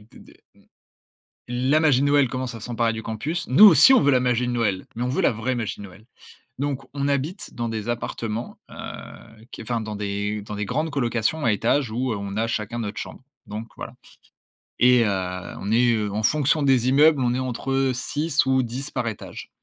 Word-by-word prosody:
d - - -16
d - - -17 1.2
la 130 +5 +2
magie 145 -5 +3
de 145 - +2
Noël 140 -3 +3
commence 130 -1 -4
à 115 - -8
s'emparer 115 0 -1
du 110 - -6
campus. 140 +11 -4
Nous 135 +12 +7
aussi, 210 - +8
on - - +6
veut 145 - +4
la 130 -2 +3
magie 125 -1 +1
de 125 - -2
Noël, 105 -6 -1
mais 120 - -4
on 125 - 0
veut 130 - -1
la - - +3
vraie 125 +4 -2
magie 110 -4 -4
de 100 - -8
Noël. 95 +3 -16 0.5
Donc, 140 -1 -2
on 140 0 -2
habite 140 +5 -3
dans 120 -1 -3
des 110 0 -5
appartements, 115 -1 -4
heu, 110 0 -10
qui - - -8
enfin 115 0 -2
dans 110 -1 -5
des 100 +1 -3
dans 105 0 -7
des 105 - -3
grandes 155 +8 -2
colocations 125 +2 -1
à 115 - +3
étages 120 +4 +1
où 125 +2 -1
on 100 0 -5
a 115 +1 0
chacun 115 +1 -3
notre 105 -2 -5
chambre. - - -8 0.2
Donc 110 +2 -7
voilà - - -8 0.8
et 125 -1 +5
heu, 90 -3 -3
on 100 +3 -3
est 115 -3 +2
en 105 +2 -3
fonction 150 +4 +2
des 130 -3 +3
immeubles, 145 +1 +5
on 120 -1 +1
est 125 - -1
entre 135 +1 -1
6 150 +4 0
ou 130 0 +2
10 130 +4 -5
par 125 -3 -2
étage 110 - -7
120 Hz, 210 wpm, -23 LUFS, 110-135 Hz, 1.2 s, aussi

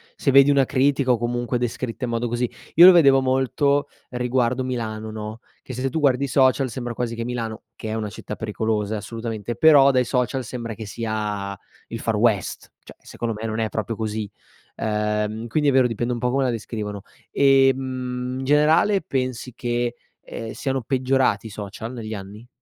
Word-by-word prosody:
se 140 - +1
vedi 140 +1 +7
una 140 -1 +5
critica 135 -1 +2
o 120 - +3
comunque 120 +1 -1
descritta 120 +1 -3
in 120 - -4
modo 115 0 -1
così. 120 0 -1 0.3
Io 170 +3 +10
lo 185 - +11
vedevo 140 -6 +6
molto 135 +2 +1 0.2
riguardo 125 +1 0
Milano, 110 -3 -4
no, 110 +1 -6 0.2
che 130 - -9
se 130 +2 -2
tu 160 - -2
guardi 140 -2 +2
i - - 0
social 130 0 +3
sembra 120 0 -5
quasi 115 -1 -3
che 115 - -4
Milano, 115 -3 -4
che 110 - -6
è 110 - -2
una 105 -2 -3
città 105 - -7
pericolosa, 110 -1 -2
eh, - - -2
assolutamente, 115 0 -5
però 145 -3 +6
dai 125 -1 +2
social 125 +1 -1
sembra 115 -1 -5
che 110 +1 -8
sia 105 -2 -3 0.3
il - - -6
Far - - -1
West. - - 0
Cioè, - - -14
secondo 115 -1 -5
me 110 - -5
non 110 0 -3
è 110 - +1
proprio 110 0 -4
così. 110 -2 -3 0.5
Ehm, 105 +1 -1
quindi 150 +5 0
è - - +5
vero 130 -1 +5
dipende 120 +1 -1
un 120 - -4
po' 125 +1 0
come 135 +1 +1
la 130 - +1
descrivono. 105 -3 -4 0.3
Ehm, 130 -2 +2
in 130 - -4
generale, 160 +8 +4
pensi 130 -3 -3
che, 120 0 -2 0.3
ehm, 110 -1 -7
siano 135 -2 -2
peggiorati 130 -1 +1
i - - -8
social 105 +3 -7
negli 110 -3 -6
anni? 105 +4 -9
120 Hz, 190 wpm, -23 LUFS, 110-130 Hz, 0.5 s, lo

